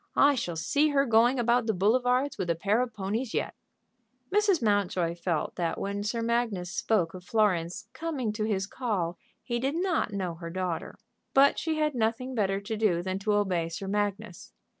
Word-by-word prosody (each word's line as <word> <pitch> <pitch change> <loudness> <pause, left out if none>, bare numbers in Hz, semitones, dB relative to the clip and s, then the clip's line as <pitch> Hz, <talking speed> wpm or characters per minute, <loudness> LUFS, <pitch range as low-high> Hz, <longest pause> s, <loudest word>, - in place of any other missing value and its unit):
I 285 +1 +6
shall 180 -10 -3
see 285 - +2
her 280 -1 +3
going 235 +2 +4
about 240 0 +2
the 220 - +1
boulevards 250 +7 +2
with 180 -2 -2
a 170 - +2
pair 205 +7 +1
of 250 -1 -2
ponies 215 +4 -3
yet." - - -1 0.8
Mrs. 410 -4 +3
Mountjoy 200 -6 +1
felt 170 -2 -2
that 170 -2 -1
when 200 +1 -3
Sir 230 +3 -2
Magnus 230 -6 -1
spoke 185 -7 0
of 185 -1 -9
Florence 195 -2 0
coming 285 -9 -3
to 215 0 -2
his 195 -3 0
call 200 -7 -2 0.2
he 240 -1 -2
did 270 +4 -1
not 345 - 0
know 190 -4 -2
her 170 0 -8
daughter. 180 -1 -3 0.4
But 275 +1 +5
she 320 -1 -1
had 305 -1 +1
nothing 240 +2 -1
better 195 -4 0
to 205 +2 -4
do 200 -6 +1
than 190 +1 -2
to 210 +1 0
obey 185 -5 +1
Sir 180 +4 -6
Magnus. 205 - -3
210 Hz, 185 wpm, -28 LUFS, 185-245 Hz, 0.8 s, I